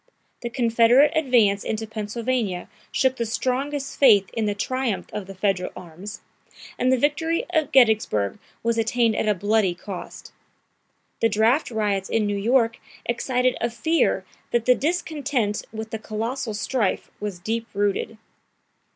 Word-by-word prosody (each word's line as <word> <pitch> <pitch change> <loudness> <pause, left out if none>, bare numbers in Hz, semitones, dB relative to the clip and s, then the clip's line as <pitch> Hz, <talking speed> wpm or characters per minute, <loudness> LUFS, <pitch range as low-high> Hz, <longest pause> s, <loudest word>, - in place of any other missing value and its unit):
The 240 - -3
Confederate 240 +3 +4
advance 240 -10 +3
into 220 0 -2
Pennsylvania 220 -2 -2 0.2
shook 260 -1 +1
the 235 - -1
strongest 270 +4 -2
faith 205 -8 +6
in 220 -2 -1
the 205 - -1
triumph 255 0 -1
of 205 -3 -5
the 195 - -9
Federal 190 -1 0
arms, 180 +4 -9 0.6
and 255 +1 +3
the 260 - +4
victory 315 +5 0
of 310 -2 +1
Gettysburg 220 - +3 0.2
was 230 0 +1
attained 225 0 +2
at - - 0
a 210 - +3
bloody 205 -1 +1
cost. 185 +1 -9 0.9
The 230 - +3
draft 225 +8 +2
riots 205 -4 -1
in 225 -2 +1
New 205 0 -1
York 230 +2 +2 0.3
excited 250 +1 +1
a 235 - +1
fear 320 +9 +1 0.2
that 235 -1 0
the 250 - +6
discontent 285 -8 -1
with 220 0 -6
the 225 - -3
colossal 225 +2 -3
strife 220 -1 -1
was 205 -3 -4
deep 225 +5 -3
rooted. 205 +2 0
225 Hz, 145 wpm, -24 LUFS, 205-255 Hz, 0.9 s, faith